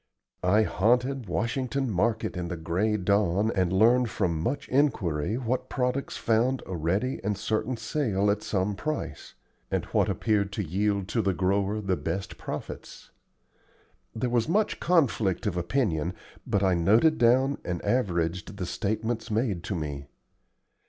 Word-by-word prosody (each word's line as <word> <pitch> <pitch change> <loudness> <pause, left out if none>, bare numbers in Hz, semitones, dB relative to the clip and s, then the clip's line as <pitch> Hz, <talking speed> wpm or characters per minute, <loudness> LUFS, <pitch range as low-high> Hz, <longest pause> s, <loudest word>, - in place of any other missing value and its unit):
I 100 +5 +4
haunted 125 +5 +1
Washington 125 - -1
Market 110 +3 0
in 90 -1 -3
the 85 0 -4
gray 90 +7 0
dawn 100 +1 +2
and 95 -3 +1
learned 115 +5 +4
from 85 -7 -1
much 125 - -2
inquiry 110 - +1
what 130 +1 -2
products 130 +1 -1
found 120 +4 +1
a 95 - -5
ready 95 - -1
and 105 0 -1
certain 110 +4 -1
sale 110 -4 0
at 105 +1 -1
some 100 0 -1
price, 155 +8 -5 0.3
and - - -1
what - - +3
appeared 105 -3 +1
to 105 - -2
yield 100 +3 0
to 115 - +1
the 95 -3 0
grower 100 +3 +1
the 95 -3 0
best 90 +4 -4
profits. - - -7 1.0
There 120 +2 -1
was 120 +2 +1
much 210 +4 +1
conflict 125 - +2
of 100 -4 0
opinion, 90 - 0 0.3
but 100 -1 +1
I 95 -1 +3
noted 110 - +4
down 130 +4 +3
and 85 -1 -3
averaged 90 -5 0
the 95 - -3
statements 110 +5 -2
made 105 -5 0
to 95 - -2
me. 70 -3 -4
105 Hz, 150 wpm, -27 LUFS, 90-120 Hz, 1.0 s, I